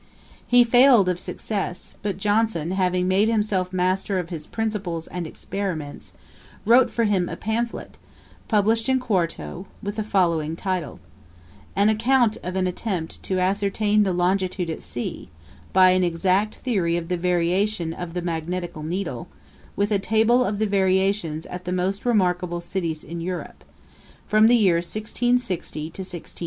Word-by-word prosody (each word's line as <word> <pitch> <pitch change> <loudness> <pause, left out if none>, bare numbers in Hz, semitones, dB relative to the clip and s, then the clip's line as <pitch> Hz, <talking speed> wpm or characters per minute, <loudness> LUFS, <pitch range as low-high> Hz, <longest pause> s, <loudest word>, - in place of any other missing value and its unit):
He 245 0 +6
failed 245 -3 +6
of 180 -1 -1
success; 195 -3 -4
but 200 -3 -2
Johnson 205 -5 +1
having 180 -1 +1
made 195 +4 +3
himself 210 -5 0
master 185 +2 0
of 175 -2 -3
his 155 -3 -6
principles 200 -7 -3
and 175 -2 -5
experiments, 165 -5 -5 0.5
wrote 240 +3 +6
for 230 - 0
him 195 -5 +1
a - - -4
pamphlet, 230 +2 -3 0.5
published 220 +2 +2
in 260 0 +3
quarto, 185 -4 -2 0.2
with 205 +1 -4
the 215 - 0
following 170 -6 +1
title: 180 - -3 0.8
_An 205 +2 +5
Account 235 +1 +2
of 180 +1 -5
an 190 -1 +1
Attempt 180 -2 -3
to 190 - -2
ascertain 205 +2 +1
the 195 -2 +2
Longitude 180 -1 0
at - - -6
Sea, 120 - -5 0.4
by 185 -1 +6
an 185 0 +3
exact 185 +5 +1
Theory 185 -9 0
of 170 -1 -4
the 180 - 0
Variation 180 +1 0
of 175 0 -7
the 180 - -2
Magnetical 170 0 -3
Needle; 160 -6 -4 0.5
with 205 +1 0
a 205 - +3
Table 225 +5 +3
of 205 -4 -1
the 215 - +1
Variations 190 -4 +1
at 180 0 -8
the 180 - -3
most 190 +5 -1
remarkable 180 -5 +1
Cities 170 -3 -3
in 170 +2 -6
Europe, 180 +1 -5 0.6
from 215 +1 +5
the 240 - +6
year 190 -7 +4
1660 215 -4 -2
to 190 - -7
1680_. 180 -3 -8
190 Hz, 155 wpm, -23 LUFS, 175-215 Hz, 0.8 s, He